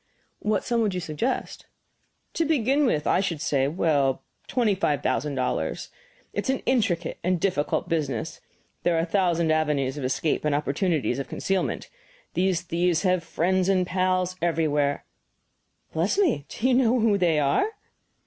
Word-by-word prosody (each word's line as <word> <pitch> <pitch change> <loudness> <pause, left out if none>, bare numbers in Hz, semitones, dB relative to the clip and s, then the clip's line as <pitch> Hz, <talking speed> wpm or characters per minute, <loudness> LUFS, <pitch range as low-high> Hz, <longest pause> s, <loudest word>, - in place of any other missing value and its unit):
"What 210 -1 0
sum 235 -1 0
would 205 -4 0
you - - -1
suggest?" 175 - -3 0.7
"To 330 - +1
begin 285 -2 +2
with, 150 -10 0
I - - +3
should 185 -5 -1
say 140 -2 +1
well, 145 -4 +1 0.2
twenty 235 -5 +2
five 150 -8 0
thousand 145 -1 0
dollars. 130 -1 -2 0.4
It - - -2
is - - -3
an - - -9
intricate 200 -10 0
and 180 0 +1
difficult 175 -3 0
business; 160 -2 -2 0.4
there 175 - +2
are 165 - +2
a - - -1
thousand 170 -3 +1
avenues 150 -3 0
of - - -5
escape 135 +4 0
and 150 -1 +1
opportunities 145 - 0
of 135 - -4
concealment. 195 -1 -2 0.5
These 185 -2 +1
thieves 175 0 0
have 185 -2 +2
friends 185 +3 0
and 185 -2 +3
pals 185 0 0
everywhere 150 -4 +1 0.4
" - - -44
"Bless 170 - 0
me, 290 - +1
do 235 - -1
you 260 - +3
know 250 -1 +3
who 215 -3 +3
they 170 -4 +3
are?" 150 - +1
175 Hz, 165 wpm, -25 LUFS, 150-200 Hz, 0.7 s, I